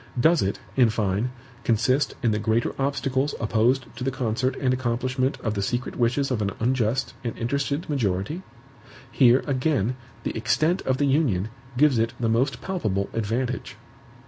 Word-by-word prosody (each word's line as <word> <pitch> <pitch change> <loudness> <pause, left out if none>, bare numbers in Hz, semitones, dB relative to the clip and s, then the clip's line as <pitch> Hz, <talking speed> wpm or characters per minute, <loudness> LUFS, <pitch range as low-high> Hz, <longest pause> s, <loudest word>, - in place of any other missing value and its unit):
Does 160 +6 +4
it, 95 - -1 0.2
in 125 -3 +5
fine, 110 +1 0 0.3
consist 120 +5 +2
in 115 - +3
the 105 - 0
greater 110 +2 +1
obstacles 135 0 0
opposed 115 +4 +2
to - - -4
the 135 - +1
concert 130 0 -1
and 130 -2 +1
accomplishment 130 +1 -1
of 110 -3 -1
the 100 - -2
secret 120 +6 -2
wishes 130 +3 +1
of 115 -4 0
an 100 - +1
unjust 125 +1 0
and 115 - -4
interested 140 +6 -1
majority? 120 - -1 0.7
Here, 125 0 +5
again, 130 -4 +1 0.3
the - - -3
extent 155 +10 +1
of 130 -1 +2
the 145 - +2
Union 130 - +2 0.3
gives 140 -3 +4
it 115 +2 +1
the 115 -2 +1
most 120 +2 +1
palpable 105 - -2
advantage. 120 +3 -2
125 Hz, 160 wpm, -25 LUFS, 110-135 Hz, 0.7 s, in